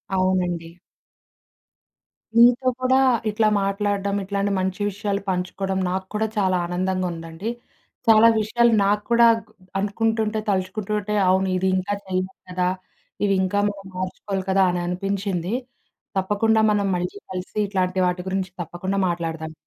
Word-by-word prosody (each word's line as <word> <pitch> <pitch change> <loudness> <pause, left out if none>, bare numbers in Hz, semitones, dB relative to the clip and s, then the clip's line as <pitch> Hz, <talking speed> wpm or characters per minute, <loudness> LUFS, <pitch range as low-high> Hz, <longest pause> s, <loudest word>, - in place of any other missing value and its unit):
అవునండి. 180 -3 0 1.7
నీతో 245 +2 +6
కూడా 260 +1 +4 0.3
ఇట్లా 215 +1 +2 0.2
మాట్లాడడం 200 0 -1
ఇట్లాంటి 200 +1 -1
మంచి 185 +1 -2
విషయాలు 200 0 -2
పంచుకోవడం 190 +1 -2
నాకూడా 190 +4 -2
చాలా 185 -2 +2
ఆనందంగా 185 +1 -1
ఉందండి. 165 +6 -6 0.6
చాలా 225 +1 +7
విషయాలు 235 +2 +3
నాకూడా 230 +3 +4 0.5
అనుకుంటుంటే, 220 +1 0
తలుచుకుంటుంటే 205 +2 -1
అవును 190 +1 +3
ఇది 190 +1 0
ఇంకా 190 +2 -2
చేయాలి 185 0 -2 0.2
కదా! 180 0 0 0.6
ఇవి 195 - +2
ఇంకా 205 +2 0
మనం 200 -1 -9
మార్చుకోవాలి 185 +1 -3
కదా! 190 0 +4
అని 175 0 -2
అనిపించింది. 195 0 -2 0.6
తప్పకుండా 210 +3 +2
మనం 200 -1 +1
మళ్ళీ 180 +2 -3 0.2
కలిసి 185 +3 -6
ఇట్లాంటి 185 -1 0
వాటి 180 0 -1
గురించి 190 -1 -2
తప్పకుండా 185 +4 -3
మాట్లాడుదాం. 165 -2 -4
195 Hz, 120 wpm, -23 LUFS, 185-210 Hz, 1.7 s, చాలా